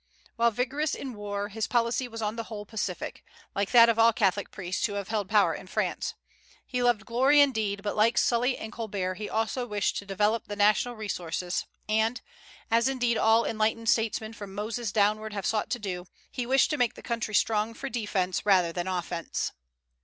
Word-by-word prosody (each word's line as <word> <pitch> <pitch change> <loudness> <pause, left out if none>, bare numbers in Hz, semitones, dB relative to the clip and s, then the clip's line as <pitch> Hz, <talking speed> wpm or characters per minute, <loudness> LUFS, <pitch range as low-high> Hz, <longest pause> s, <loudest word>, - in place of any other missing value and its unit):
While 235 0 +4
vigorous 260 +7 -1
in 265 -2 -6
war, 205 -1 -4
his 220 +1 -3
policy 240 +1 +1
was 225 -1 -6
on 210 +1 -1
the 230 -1 -4
whole 210 -2 -7
pacific, 220 +1 -4 0.3
like 200 0 -1
that 235 -2 +8
of 230 -1 +2
all 230 +1 +7
Catholic 200 -2 +1
priests 185 -1 -4
who 205 - -6
have 200 -1 -4
held 210 -3 -1
power 210 -1 +4
in - - -8
France. - - -2 0.5
He 250 -1 -2
loved 240 -3 +2
glory 265 +5 +4
indeed, 220 -8 +2
but, 205 - -2
like 220 +2 +3
Sully 245 +2 +2
and 220 - -7
Colbert, 200 -5 -3
he 210 - -4
also 225 +3 -1
wished 205 -3 0
to 200 - -5
develop 210 +3 +1
the 205 - -5
national 210 +4 +3
resources; 180 -4 -3 0.2
and, 220 +3 +1 0.5
as 230 +2 +4
indeed 245 -3 +1
all 225 +1 +4
enlightened 225 +1 0
statesmen 220 0 +1
from 200 -3 -9
Moses 220 +1 -3
downward 215 +1 +1
have 200 -2 -4
sought 215 -2 0
to 245 - -1
do, 185 -5 -5 0.2
he 245 -2 -3
wished 265 +4 +4
to 300 - 0
make 245 -3 +1
the - - -12
country 230 -3 -2
strong 220 +2 +1
for 275 - -5
defence 205 -7 -1
rather 185 -4 +4
than 175 +1 -3
offence. 175 -2 -2
220 Hz, 195 wpm, -28 LUFS, 205-235 Hz, 0.5 s, that